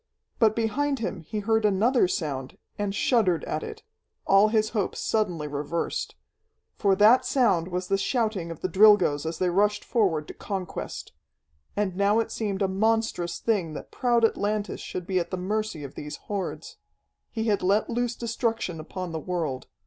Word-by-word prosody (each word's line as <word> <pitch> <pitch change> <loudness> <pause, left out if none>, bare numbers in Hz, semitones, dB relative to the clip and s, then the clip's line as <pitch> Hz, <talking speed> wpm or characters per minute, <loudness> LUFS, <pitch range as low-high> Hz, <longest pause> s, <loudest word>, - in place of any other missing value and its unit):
But 220 -2 +4
behind 275 +6 0
him 205 -6 -4
he 210 +7 -4
heard 220 +1 +1
another 210 +3 +3
sound, 140 -7 -3 0.2
and 205 -1 -2
shuddered 195 - +2
at 155 - -3
it, - - -8 0.4
all 195 +2 +6
his 215 0 +1
hopes 210 -4 -2
suddenly 180 -9 -1
reversed. 150 +3 -3 0.6
For 200 -2 +2
that 220 +6 +6
sound 215 -11 +2
was 180 0 -3
the 195 0 +1
shouting 215 -6 -1
of 165 - -8
the - - 0
Drilgoes 190 -7 +5
as 160 - -3
they 180 -1 +1
rushed 205 +3 +1
forward 175 - +1
to - - -8
conquest. 190 -4 -5 0.6
And 200 -3 -1
now 200 +2 +3
it 225 - -1
seemed 205 -3 -2
a - - +2
monstrous 200 -3 0
thing 185 -9 -1
that - - -8
proud 240 -2 +2
Atlantis 210 -1 -1
should 180 - -5
be 185 0 +1
at 170 - -3
the 185 - -3
mercy 205 -3 -2
of 140 - -8
these 150 0 -6
hordes. 200 -3 -5 0.5
He 225 - -3
had 210 -3 +1
let 200 +4 +2
loose 240 0 -1
destruction 230 -6 -2
upon 180 +2 -6
the 160 - -3
world. 160 -7 -3
200 Hz, 170 wpm, -26 LUFS, 175-220 Hz, 0.6 s, all